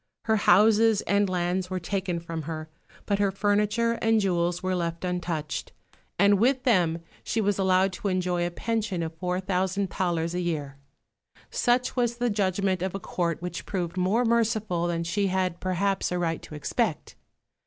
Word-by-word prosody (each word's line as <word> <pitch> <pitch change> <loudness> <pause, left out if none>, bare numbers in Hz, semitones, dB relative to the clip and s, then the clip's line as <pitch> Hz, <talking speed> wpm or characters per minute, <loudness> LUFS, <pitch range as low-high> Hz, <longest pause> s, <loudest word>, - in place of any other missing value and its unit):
Her 220 -1 +2
houses 215 +3 +5
and 200 -1 +1
lands 180 0 -1
were 185 -1 -2
taken 185 -1 -2
from 165 -1 -5
her; 155 -1 -6 0.3
but 200 -1 0
her 200 -1 +3
furniture 210 +4 +1
and 225 0 +3
jewels 175 -2 0
were 185 0 0
left 170 -1 -2
untouched, 175 -4 -3 0.4
and 200 0 +5
with 255 +3 +2
them 170 -9 +2 0.2
she 230 - -1
was 205 -2 +1
allowed 190 0 +3
to 200 - -4
enjoy 180 -2 0
a 175 - 0
pension 210 -1 -2
of 160 0 -4
four 180 +2 -2
thousand 190 0 -1
thalers 170 -2 -1
a 180 - -1
year. 150 -5 -3 0.7
Such 250 0 +1
was 240 -2 0
the 245 -1 0
judgment 190 -2 0
of 190 0 -2
a - - -3
Court 170 -3 -2
which 180 - -5
proved 180 -3 -3
more 190 +7 +2
merciful 220 -6 +1
than 170 -1 -1
she 200 +4 0
had 185 -2 -1
perhaps 190 +1 0
a 180 - 0
right 165 -2 -1
to 155 - -10
expect. 150 - -2
185 Hz, 175 wpm, -26 LUFS, 175-205 Hz, 0.7 s, houses